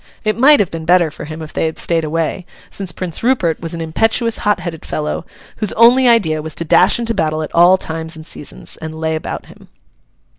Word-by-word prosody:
It 215 Hz, -1 st, 0 dB
might 285 Hz, +5 st, +6 dB
have 200 Hz, -4 st, 0 dB
been 165 Hz, -1 st, -6 dB
better 175 Hz, -2 st, +3 dB
for -, -, -9 dB
him 155 Hz, +1 st, -7 dB
if 155 Hz, -, -10 dB
they -, -, 0 dB
had 160 Hz, -, -5 dB
stayed 165 Hz, -1 st, 0 dB
away; 165 Hz, +3 st, -2 dB, 0.2 s
since 195 Hz, -3 st, -3 dB
Prince 170 Hz, -2 st, -4 dB
Rupert 225 Hz, -, +1 dB
was 165 Hz, 0 st, -5 dB
an 165 Hz, -, -5 dB
impetuous, 225 Hz, +8 st, +1 dB
hot 210 Hz, -3 st, +1 dB
headed 170 Hz, -3 st, -6 dB
fellow, 150 Hz, 0 st, -4 dB, 0.3 s
whose 215 Hz, -3 st, 0 dB
only 245 Hz, +3 st, +5 dB
idea 185 Hz, -10 st, +3 dB
was 155 Hz, 0 st, -5 dB
to 170 Hz, -, -3 dB
dash -, -, +5 dB
into 230 Hz, -1 st, -1 dB
battle 155 Hz, -5 st, -1 dB
at 155 Hz, -, -8 dB
all 175 Hz, +2 st, +6 dB
times 160 Hz, -2 st, -5 dB
and 155 Hz, 0 st, -11 dB
seasons, 150 Hz, -, -10 dB
and 160 Hz, 0 st, -8 dB
lay 160 Hz, 0 st, -1 dB
about 155 Hz, -, -5 dB
him. -, -, -17 dB
165 Hz, 220 wpm, -16 LUFS, 160-210 Hz, 0.3 s, might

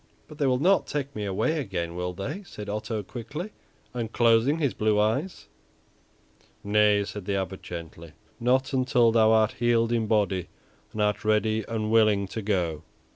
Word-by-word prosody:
"But 150 Hz, 0 st, -13 dB
they 140 Hz, -, +2 dB
will 130 Hz, -1 st, +2 dB
not 185 Hz, +8 st, +3 dB
take 140 Hz, -1 st, -4 dB
me 105 Hz, -1 st, -3 dB
away 130 Hz, +12 st, 0 dB
again, 90 Hz, -, -3 dB
will 90 Hz, 0 st, -3 dB
they?" 100 Hz, -, -5 dB
said 105 Hz, -, -9 dB
Otto 105 Hz, +1 st, -3 dB
quickly, 140 Hz, -, -7 dB, 0.4 s
unclosing 115 Hz, +3 st, +2 dB
his 145 Hz, -6 st, 0 dB
blue 105 Hz, -1 st, +1 dB
eyes. 125 Hz, -, -1 dB, 1.2 s
"Nay," 105 Hz, 0 st, +3 dB
said 100 Hz, -1 st, -7 dB
the 100 Hz, -, -1 dB
Abbot, 95 Hz, -1 st, -3 dB
gently; 85 Hz, -1 st, -9 dB, 0.3 s
"not 130 Hz, +3 st, +1 dB
until 125 Hz, -3 st, +3 dB
thou 110 Hz, -1 st, +4 dB
art 110 Hz, -1 st, +4 dB
healed 115 Hz, -1 st, +2 dB
in 115 Hz, -2 st, 0 dB
body 100 Hz, -5 st, +1 dB, 0.4 s
and 105 Hz, -, -1 dB
art 105 Hz, 0 st, 0 dB
ready 110 Hz, +1 st, +1 dB
and 110 Hz, -1 st, -2 dB
willing 110 Hz, -3 st, +3 dB
to 110 Hz, -, -5 dB
go." 90 Hz, -7 st, -1 dB
110 Hz, 165 wpm, -26 LUFS, 100-120 Hz, 1.2 s, thou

